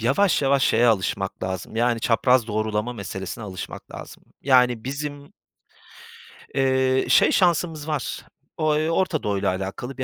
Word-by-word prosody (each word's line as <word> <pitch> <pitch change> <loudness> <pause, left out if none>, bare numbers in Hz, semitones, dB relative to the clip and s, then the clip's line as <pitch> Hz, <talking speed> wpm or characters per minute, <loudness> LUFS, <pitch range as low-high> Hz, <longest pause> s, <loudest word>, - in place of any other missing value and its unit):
yavaş 145 - +2
yavaş 135 0 +2
şeye 120 +2 +3
alışmak 95 -3 0
lazım, 95 +3 -5
yani, 120 0 +1
çapraz 120 +1 +2
doğrulama 110 +2 -2
meselesine 100 0 -6
alışmak 95 -2 -8
lazım. - - -10 0.2
Yani, 125 -4 +3
bizim 145 +3 -6 1.2
eee, 130 -1 +2
şey, - - +5
şansımız 165 -4 +1
var 150 -5 -3 0.3
o 155 -1 +1
eee, 155 +1 0
Orta 165 -2 0
Doğu'yla 100 -2 0
alakalı 100 +8 -5
bir 130 - -2
125 Hz, 140 wpm, -23 LUFS, 110-145 Hz, 1.2 s, şey